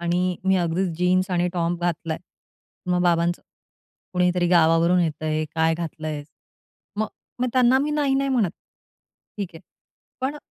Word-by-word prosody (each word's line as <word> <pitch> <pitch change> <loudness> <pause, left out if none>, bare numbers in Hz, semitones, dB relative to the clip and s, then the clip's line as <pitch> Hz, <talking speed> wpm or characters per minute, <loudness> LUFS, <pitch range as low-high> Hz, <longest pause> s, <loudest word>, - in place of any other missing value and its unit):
आणि 175 +1 0
मी 190 0 +4
अगदीच 175 +2 0
जीन्स 185 +1 +2
आणि 175 0 +1
टॉप 175 -1 -1
घातलाय. 165 -2 -2 0.7
मग 180 0 +1
बाबांचं, 175 0 +2 0.7
"कुणीतरी 180 -1 +2
गावावरून 170 +1 +4
येतंय, 155 -1 -1
काय 160 0 +2
घातलं 160 -2 -5
आहेस." 145 -1 -5 0.7
मग 215 0 0 0.3
मग 250 - +2
त्यांना 255 0 +5
मी 290 +2 0
नाही-नाही 275 -2 +1
म्हणत. 225 -9 +2 0.9
ठीक 200 -4 -3
आहे 165 - -10 0.6
पण 275 +3 -1
175 Hz, 135 wpm, -24 LUFS, 165-190 Hz, 0.9 s, त्यांना